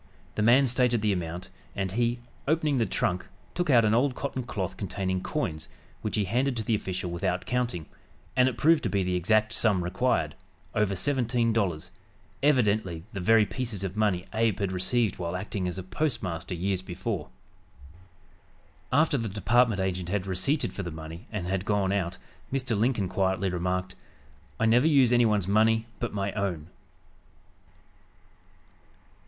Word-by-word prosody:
The - - -2
man 120 +5 +6
stated 125 -3 +2
the 105 -2 +3
amount, 90 0 -5 0.2
and 95 -2 -2
he, 120 +3 0 0.3
opening 150 -3 +2
the 115 - +2
trunk, 90 +1 -1 0.3
took 175 -2 -1
out 120 -5 +6
an 105 - +3
old 125 +3 +2
cotton 135 -1 -3
cloth 100 -6 -4
containing 95 -1 -2
coins, 90 - -3 0.3
which 110 - -2
he 105 - +2
handed 125 +5 0
to 110 - -2
the 110 - 0
official 95 -4 -2
without 90 +1 -1
counting, 120 -10 -1 0.5
and 125 0 +5
it 125 - -7
proved 160 0 +4
to - - -1
be 100 -2 +1
the 90 0 -1
exact 110 +5 +2
sum 100 -6 +2
required, 90 -4 0 0.4
over 105 -2 +1
seventeen 120 0 +2
dollars, 90 -5 -1 0.5
evidently 105 - +2
the 100 - -4
very 110 +4 +5
pieces 115 -4 -4
of 95 0 -4
money 100 -4 +1
Abe 110 -3 +2
had 100 -3 -1
received 105 +4 0
while 85 0 -3
acting 95 0 -3
as 90 +1 -4
postmaster 95 - -3
years 95 +2 -1
before! 95 -1 -4 1.6
After 145 0 +3
the 115 -1 -2
department 115 +1 +2
agent 90 -2 -2
had 100 0 -1
receipted 95 - 0
for - - -4
the 90 - -4
money 80 +5 -9
and 105 -5 -3
had 95 +1 -1
gone 100 -2 +1
out, 95 -2 -1 0.3
Mr. 130 -4 0
Lincoln 110 -2 +1
quietly 95 0 0
remarked: 90 +1 -2 0.7
"I 115 - +2
never 120 +6 +5
use 135 -6 +5
anyone's 110 -6 +3
money 110 +2 +3
but 120 - -2
my 100 -1 -2
own." 90 -6 -3
105 Hz, 160 wpm, -27 LUFS, 90-120 Hz, 1.6 s, man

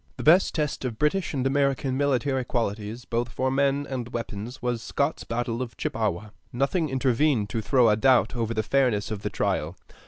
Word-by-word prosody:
The - - -5
best 175 +5 +5
test 150 -3 -1
of 120 -4 -3
British 160 +7 +1
and 135 -3 -2
American 135 -1 +1
military 135 -1 +1
qualities, 115 0 -3
both 120 0 -1
for 130 +2 -1
men 140 +1 +1
and 125 -3 -4
weapons, 115 0 -5
was 120 -2 -2
Scott's - - -1
battle 120 0 -2
of 125 -2 -6
Chippawa. 105 -1 -2 0.2
Nothing 140 +6 0
intervened 130 -4 +1
to 115 - -1
throw 125 +3 +3
a 105 - +5
doubt 125 +3 +3
over 115 -1 -2
the 110 - 0
fairness 120 -5 +1
of 105 -2 -4
the - - -2
trial. 80 +4 -1
125 Hz, 185 wpm, -26 LUFS, 115-135 Hz, 0.2 s, best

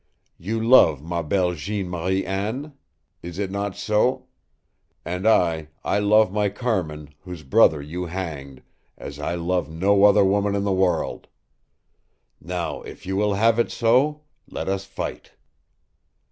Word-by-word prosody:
You 110 +6 -3
love 110 - +5
ma 85 +1 -3
belle 90 +2 0
Jeanne 95 +4 -4
Marie 90 +2 -1
Anne? 110 +10 -3 0.5
Is 85 0 -8
it 100 -2 -3
not 100 -1 -3
so? 110 +4 +1 0.8
And 90 +4 -2
I 85 -7 +2 0.2
I 100 - +1
love 105 -1 +3
my 105 -1 +1
Carmin, 90 - -3
whose 90 -4 -9
brother 70 +2 +4
you 90 +4 -5
hanged, 75 -7 -6 0.3
as 70 +1 -9
I 75 +4 -2
love 85 -2 -1
no 100 +5 +3
other 105 -1 +5
woman 100 +1 +1
in 100 - -1
the 100 - 0
world. 95 -3 0 1.1
Now, 85 -2 -4
if - - -11
you 95 +1 -3
will 105 0 +1
have 115 +3 +3
it 120 - +2
so, 130 +6 +2 0.3
let - - -5
us 95 0 -2
fight!" 100 - -7
95 Hz, 145 wpm, -23 LUFS, 85-105 Hz, 1.1 s, love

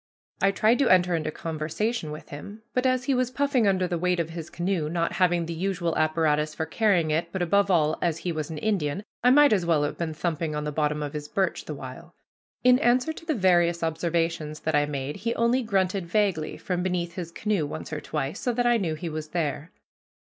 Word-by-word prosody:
I 195 - +5
tried 215 +5 +3
to 275 - +3
enter 180 -1 +4
into 155 -1 -2
conversation 160 +6 -3
with 150 +1 -8
him, 205 +9 -9
but 250 +1 +2
as 255 -1 +1
he 275 - +1
was 255 -1 +1
puffing 260 -3 +1
under 185 -2 +2
the 175 -2 -2
weight 180 0 +1
of 165 -1 -2
his 165 -1 -7
canoe, 175 -3 -1
not 170 0 0
having 175 -2 +2
the 165 - -4
usual 175 -1 -1
apparatus 155 -1 +1
for 160 - -2
carrying 175 -2 +2
it, 170 +2 -1
but, 190 -1 -1
above 200 +3 +2
all, 155 -4 +2
as 170 -2 +1
he 175 +1 -3
was 155 -2 -3
an 160 - -5
Indian, 190 -2 -1 0.2
I 250 - +6
might 290 0 +6
as 190 -4 +2
well 165 -3 +2
have 145 - -3
been 160 -2 -3
thumping 155 0 -2
on 150 - -2
the 150 - -3
bottom 150 0 0
of 145 - -5
his 150 -1 -5
birch 190 +5 -1
the - - -5
while. - - -10 0.5
In 250 0 +6
answer 250 +4 +2
to 330 - -12
the 310 - +1
various 175 -4 +3
observations 165 -1 -1
that 160 - -1
I 145 0 +3
made 140 0 -4
he 230 +2 -2
only 235 +3 +2
grunted 195 -4 0
vaguely 185 -5 0
from 180 -1 -2
beneath 175 -2 -2
his 170 -2 -6
canoe 200 -4 -1
once 150 - -7
or 155 - -3
twice, 150 -1 -3
so 245 - -1
that 245 +1 0
I 240 -1 +4
knew 170 -7 -1
he 170 +2 -6
was 155 -1 -4
there. 155 -1 -2
170 Hz, 225 wpm, -26 LUFS, 155-200 Hz, 0.5 s, I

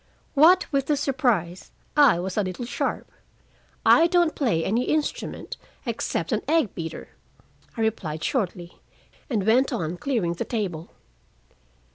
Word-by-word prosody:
What 330 +6 +6
with 275 -1 +1
the 295 - +2
surprise, 235 - 0 0.3
I 285 - +6
was 185 +2 -4
a 210 - +2
little 185 +5 -4
sharp. 240 - -3 0.7
"I 330 - +6
don't 345 -2 +2
play 205 - 0
any 230 +6 +1
instrument 310 +10 -2 0.3
except - - -2
an - - +1
egg 320 -10 +2
beater," 165 -1 -6 0.7
I - - -2
replied 175 -8 -2
shortly, 180 -8 -3 0.5
and 215 -7 -1
went 250 +5 +3
on 165 +1 -3
clearing 215 -8 -1
the 170 - -3
table. 180 -8 -3
225 Hz, 135 wpm, -25 LUFS, 175-280 Hz, 0.7 s, What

